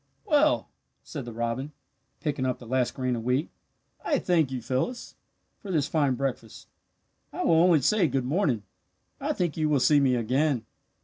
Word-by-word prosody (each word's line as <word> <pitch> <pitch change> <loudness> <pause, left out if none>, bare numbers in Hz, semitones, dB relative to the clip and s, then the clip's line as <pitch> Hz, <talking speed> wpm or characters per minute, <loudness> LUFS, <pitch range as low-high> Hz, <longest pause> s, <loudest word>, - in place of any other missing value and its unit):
"Well," 305 0 +3 0.4
said 145 -6 -7
the 120 - -6
robin, 120 +5 -3 0.5
picking 145 -4 -2
up 130 -1 0
the 120 - -13
last 125 +1 0
grain 130 -2 -1
of 115 - -5
wheat, 125 +6 0 0.5
"I 295 - +1
thank 170 - +2
you, 130 -1 -3
Phyllis, 130 - -3 0.5
for 200 - -10
this 155 -6 +1
fine 145 -3 +1
breakfast. 125 -4 -4 0.6
"I - - -3
will 165 -1 +4
only 170 -4 +5
say 195 +5 +3
'good 130 -2 -1
morning.' 135 - 0 0.6
I - - -1
think 175 -4 -2
you 155 -1 +1
will 145 -2 +3
see 145 +3 +5
me 135 -3 +3
again. 125 +1 0
140 Hz, 175 wpm, -27 LUFS, 125-160 Hz, 0.6 s, only